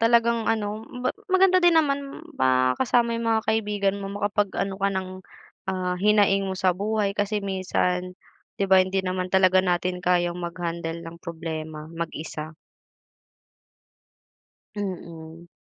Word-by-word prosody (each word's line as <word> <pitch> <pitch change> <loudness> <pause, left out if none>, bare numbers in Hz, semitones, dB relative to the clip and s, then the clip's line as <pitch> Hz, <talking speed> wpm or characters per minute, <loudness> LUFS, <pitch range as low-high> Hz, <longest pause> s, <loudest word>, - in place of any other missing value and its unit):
talagang 235 0 +3
ano, 215 -1 -2
ma 250 0 -2 0.2
maganda 370 -1 +5
din 345 -1 +5
naman 280 -3 0
makasama 130 - +2
yung 230 0 -2
mga 220 -1 +2
kaibigan 205 -3 0
mo, 195 - -5
makapag-ano 205 -1 -1
ka 200 +1 0
ng, 190 -1 -3 0.6
ah, 185 -1 -1
hinaing 205 -1 +4
mo 190 - -3
sa 185 0 +3
buhay. 205 0 -1
Kasi 205 +1 0
minsan, 180 -1 -1 0.4
'di 200 - +2
ba, 190 -1 +6
hindi 190 +1 -1
naman 185 0 -2
talaga 185 0 +5
natin 180 0 0
kayang 175 -1 +2
mag-handle 170 -1 -4
ng 165 0 -10
problema 160 -2 -6
mag-isa. 160 -2 -6 2.2
Mm, 170 -4 -7
190 Hz, 125 wpm, -25 LUFS, 175-215 Hz, 2.2 s, ba